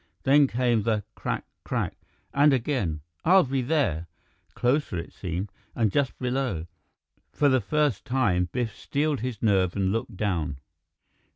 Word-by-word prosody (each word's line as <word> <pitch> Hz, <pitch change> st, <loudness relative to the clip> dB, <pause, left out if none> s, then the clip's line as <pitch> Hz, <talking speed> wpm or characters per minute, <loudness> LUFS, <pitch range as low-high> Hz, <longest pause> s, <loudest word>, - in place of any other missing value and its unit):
Then 140 Hz, +1 st, +6 dB
came 120 Hz, -2 st, +1 dB
the 105 Hz, -1 st, 0 dB
"Crack -, -, -3 dB, 0.2 s
crack -, -, -2 dB, 0.2 s
" -, -, -40 dB
and 145 Hz, +1 st, +5 dB
again, 115 Hz, -, 0 dB, 0.2 s
"I'll 185 Hz, +3 st, +6 dB
be 135 Hz, 0 st, -1 dB
there 115 Hz, -, 0 dB, 0.2 s
" -, -, -39 dB
closer, 125 Hz, -, +1 dB
it 85 Hz, -, -6 dB
seemed, 90 Hz, +2 st, -4 dB, 0.2 s
and 110 Hz, -4 st, +2 dB
just 140 Hz, +1 st, 0 dB
below. 125 Hz, -9 st, -1 dB, 0.7 s
For 145 Hz, -, +3 dB
the 130 Hz, -2 st, +3 dB
first 145 Hz, +1 st, +1 dB
time, 105 Hz, -9 st, +1 dB
Biff 120 Hz, -4 st, -2 dB
steeled 150 Hz, -1 st, -1 dB
his 120 Hz, -2 st, -4 dB
nerve 95 Hz, -5 st, +3 dB
and 95 Hz, -1 st, +1 dB
looked 115 Hz, -1 st, -3 dB
down. 85 Hz, -9 st, -1 dB
120 Hz, 155 wpm, -26 LUFS, 95-135 Hz, 0.7 s, Then